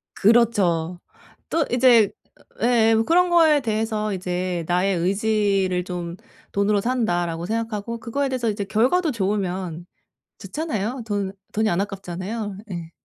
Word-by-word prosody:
그렇죠. 190 -7 +2 0.5
또 325 -2 +2
이제 240 -4 +5 0.5
예예. 225 -2 +4
그런 355 +1 +4
거에 320 -4 +5
대해서 215 -2 -1
이제 180 -1 -2
'나의 180 +2 +2
의지를 195 -1 +1
좀 175 -1 -5 0.4
돈으로 200 0 +2
산다.'라고 175 -9 -1
생각하고 225 +1 -3
그거에 275 +4 -1
대해서 250 -3 -1
이제 205 -1 -3
결과도 260 - +2
좋으면 190 -5 -2 0.5
좋잖아요. 235 - -3
돈 200 -2 -2 0.2
돈이 220 0 +1
안 175 +3 +1
아깝잖아요. 195 +1 -5
예. 170 -3 -6
205 Hz, 285 characters per minute, -23 LUFS, 185-235 Hz, 0.5 s, 이제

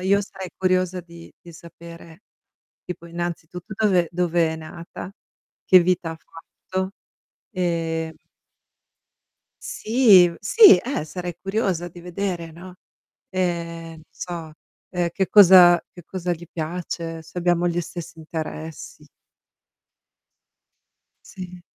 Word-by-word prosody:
io 195 +2 +3
sarei 190 -2 -8
curiosa 185 -1 +1
di 170 -1 -14
di 170 - -13
sapere 170 +1 -13 0.6
tipo, 170 -1 -7
innanzitutto, 175 +3 -6
dove 190 -5 +2
dove 175 -1 +1
è - - -4
nata, 170 +3 -9 0.5
che 185 - +8
vita 175 -1 0
ha - - -7
fatto. 185 +3 -6 0.6
Ehm 165 -3 -2 1.5
Sì, 225 - +5
v 170 - -9
sì, 405 - +8
eh, 245 - -3
sarei 175 +2 -6
curiosa 195 -4 -1
di 175 0 -11
vedere, 175 -1 -4
no, 175 +3 -12 0.6
ehm, 170 -3 -3
non 160 -1 -13
so, 170 -3 -7 0.4
uhm, 175 -2 0
che 190 +1 -1
cosa 180 -4 +8
che 175 - -12
cosa 180 0 -3
gli 175 0 -7
piace, 165 0 -5
se 170 - -8
abbiamo 175 0 +2
gli 175 0 -1
stessi 170 0 -8
interessi. 160 -1 -7 2.2
Sì. 180 -1 -10
175 Hz, 115 wpm, -23 LUFS, 165-185 Hz, 2.2 s, che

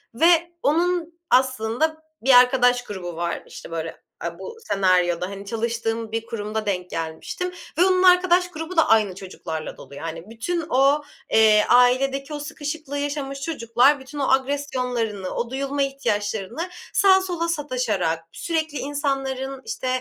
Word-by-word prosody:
ve 340 +4 +4
onun 345 +2 +1 0.2
aslında 260 +5 +1 0.2
bir 265 +2 +4
arkadaş 250 -1 +4
grubu 185 -6 -6
var. 170 +1 -3
İşte, - - -11
böyle, 165 0 -4 0.3
aaa, 170 +1 -5
bu 450 - -8
senaryoda, 180 - +2
hani, 200 0 -8
çalıştığım 225 0 -2
bir 225 0 -2
kurumda 215 -1 -4
denk 180 -3 -2
gelmiştim 165 - -4 0.3
ve 355 - +5
onun 370 -1 +3
arkadaş 360 -1 +5
grubu 325 +2 -6
da 325 - +5
aynı 210 -4 +4
çocuklarla 165 -4 -6
dolu, 140 - -12
yani. 165 +5 -7
Bütün 330 +10 -3
o, 280 +2 +3 0.3
eee, 215 -1 +6
ailedeki 270 +4 +3
o 295 - -4
sıkışıklığı 295 0 -5
yaşamış 285 -1 -3
çocuklar 275 -1 +2
bütün 265 +3 -9
o 275 - 0
agresyonlarını, 250 -7 -1
o 235 - -2
duyulma 275 +2 -2
ihtiyaçlarını 230 - -2 0.2
sağa 380 -1 +5
sola 350 -3 -2
sataşarak, 245 - -1
sürekli 315 - -2
insanların, 270 -2 -2
işte, 440 -13 -4
260 Hz, 140 wpm, -23 LUFS, 210-300 Hz, 0.3 s, eee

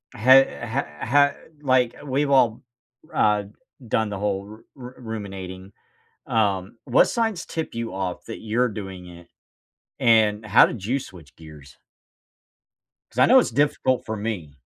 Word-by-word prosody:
Hey 130 +4 +7 0.2
heh 110 - -4
ha 140 +4 +4 0.3
like, 130 -4 +2
we've 140 +1 0
all, 120 -5 +3 0.5
uh, 105 -1 +2 0.4
done 110 0 0
the 100 - -5
whole 100 -1 -2
ru 110 +2 -13
ru 125 -2 -10
ruminating. 95 -5 -7 0.6
Um, 100 -1 0
what - - +4
signs 225 -7 -1
tip 160 -1 -5
you 115 -3 -4
off 95 -2 -4
that 115 - -7
you're 115 +3 0
doing 95 -4 -8
it, 85 -1 -13 0.7
and 110 -2 +3
how 110 +2 +6
did 105 -6 -7
you 125 +6 0
switch 90 - -13
gears? 75 -4 -14 1.3
'Cause - - -20
I - - +7
know - - +7
it's - - 0
difficult 130 0 0
for 110 - -4
me. 95 -10 -5
110 Hz, 145 wpm, -23 LUFS, 95-125 Hz, 1.3 s, Hey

